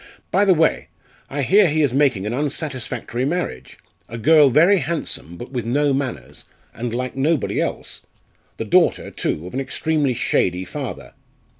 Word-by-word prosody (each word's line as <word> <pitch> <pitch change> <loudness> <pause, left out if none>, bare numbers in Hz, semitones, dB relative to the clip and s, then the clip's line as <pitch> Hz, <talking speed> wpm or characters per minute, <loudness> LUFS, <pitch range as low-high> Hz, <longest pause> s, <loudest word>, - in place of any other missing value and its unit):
By 200 - +3
the 190 - +5
way, 160 0 +1 0.4
I 140 0 -2
hear 200 +7 +5
he 155 0 +1
is 135 -4 +1
making 135 -8 +2
an 110 - -2
unsatisfactory 130 -4 -3
marriage 130 - -3 0.3
a 115 - -6
girl 150 +4 +5
very 170 +9 +5
handsome, 145 - -4
but 120 - -9
with 125 -3 -3
no 140 +5 +1
manners, 135 -2 -4 0.3
and 120 0 -4
like 125 +2 -3
nobody 145 +2 0
else - - -4 0.6
the - - -4
daughter, - - +2
too, 80 - -3
of 90 - -9
an 130 - -2
extremely 145 -1 -1
shady 90 -5 0
father. - - -7
135 Hz, 160 wpm, -21 LUFS, 120-155 Hz, 0.6 s, the